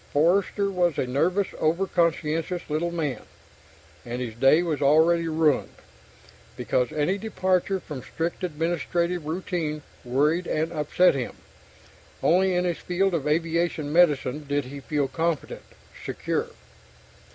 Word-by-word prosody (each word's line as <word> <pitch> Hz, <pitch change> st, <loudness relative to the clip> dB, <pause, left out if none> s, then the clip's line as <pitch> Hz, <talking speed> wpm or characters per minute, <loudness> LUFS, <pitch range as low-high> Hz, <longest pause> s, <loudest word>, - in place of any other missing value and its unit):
Forster 195 Hz, +6 st, +2 dB
was 175 Hz, -5 st, +1 dB
a -, -, +1 dB
nervous, 175 Hz, +10 st, +1 dB
over 170 Hz, +5 st, +1 dB
conscientious 170 Hz, 0 st, 0 dB
little 160 Hz, +3 st, 0 dB
man, 150 Hz, -8 st, -3 dB, 0.8 s
and 120 Hz, +1 st, -5 dB
his 120 Hz, -3 st, -4 dB
day 135 Hz, +8 st, +4 dB
was 155 Hz, -5 st, -2 dB
already 160 Hz, +4 st, +4 dB
ruined, 155 Hz, -3 st, +1 dB, 0.8 s
because 125 Hz, -1 st, 0 dB
any 165 Hz, +7 st, 0 dB
departure 190 Hz, -2 st, 0 dB
from 145 Hz, -7 st, -8 dB
strict 165 Hz, +7 st, -4 dB
administrative 170 Hz, 0 st, -1 dB
routine 160 Hz, -3 st, -3 dB, 0.2 s
worried 150 Hz, +8 st, +1 dB
and 160 Hz, +2 st, -1 dB
upset 155 Hz, +4 st, +3 dB
him. 130 Hz, -3 st, -4 dB, 0.9 s
Only 185 Hz, +2 st, +3 dB
in 180 Hz, 0 st, +1 dB
his 175 Hz, -2 st, -1 dB
field 185 Hz, +2 st, 0 dB
of 155 Hz, -4 st, -1 dB
aviation 165 Hz, -1 st, 0 dB
medicine 150 Hz, -4 st, +3 dB
did 145 Hz, -1 st, 0 dB
he 140 Hz, +2 st, -8 dB
feel 145 Hz, 0 st, -1 dB
competent, 165 Hz, +1 st, -2 dB, 0.4 s
secure. -, -, -2 dB
165 Hz, 130 wpm, -25 LUFS, 145-175 Hz, 0.9 s, day